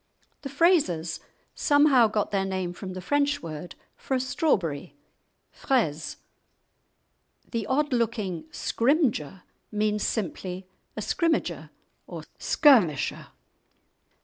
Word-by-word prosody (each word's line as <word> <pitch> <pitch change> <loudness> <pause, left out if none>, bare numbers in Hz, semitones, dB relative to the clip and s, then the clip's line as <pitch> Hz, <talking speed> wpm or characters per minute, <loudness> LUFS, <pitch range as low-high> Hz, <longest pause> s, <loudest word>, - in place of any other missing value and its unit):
The 275 - -6
Frazers 275 - +2 0.3
somehow 285 -5 +4
got 210 -1 -1
their 195 -1 +1
name 185 -2 -3
from 185 +1 -7
the 185 - -6
French 290 +6 0
word 165 +1 -7 0.2
for 265 - -3
a - - +1
strawberry, 185 - -1 0.6
fraise. 160 - -1 1.3
The 230 -4 -2
odd 285 +3 +1
looking 215 -8 -1
"Scrymgeour" 230 - 0 0.3
means 210 0 0
simply 185 -3 -3 0.3
a - - -2
scrimmager 330 -2 -1 0.4
or - - -7 0.2
skirmisher. 220 - +3
215 Hz, 100 wpm, -26 LUFS, 180-275 Hz, 1.3 s, somehow